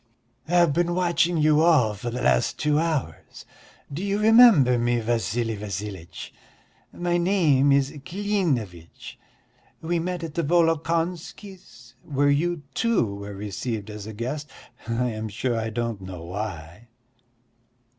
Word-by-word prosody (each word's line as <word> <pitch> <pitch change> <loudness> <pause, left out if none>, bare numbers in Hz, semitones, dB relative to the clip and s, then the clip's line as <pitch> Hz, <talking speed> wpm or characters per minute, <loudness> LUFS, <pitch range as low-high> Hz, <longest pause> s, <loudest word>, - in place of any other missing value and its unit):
"I've 170 -2 +3
been 175 +2 0
watching 175 -1 +1
you 155 0 +4
all 150 -10 +4
for 105 +4 -5
the 125 +1 -4
last - - +2
two 150 0 +1
hours. 155 - -3 0.5
Do 165 +7 -4
you 200 0 0
remember 210 - +6
me, 120 0 +1
Vassili 115 0 -1
Vassilitch? 100 -3 -7 0.6
My 175 0 -1
name 165 -7 +3
is 140 0 +2
Klinevitch, 150 - -3 0.6
we 170 +1 -1
met 175 0 -3
at 160 -2 -6
the 170 - -1
Volokonskys' 165 - -2
where 145 0 +1
you, 165 +2 0
too, 205 - +1
were 100 0 -8
received 105 +2 -5
as 105 0 -8
a 110 - -7
guest, 135 +7 -5 0.4
I 120 +1 -1
am 110 0 -5
sure 120 +4 -2
I 110 0 -2
don't 115 -2 -3
know 95 -3 -8
why." 90 +1 -7
135 Hz, 135 wpm, -24 LUFS, 110-170 Hz, 0.6 s, remember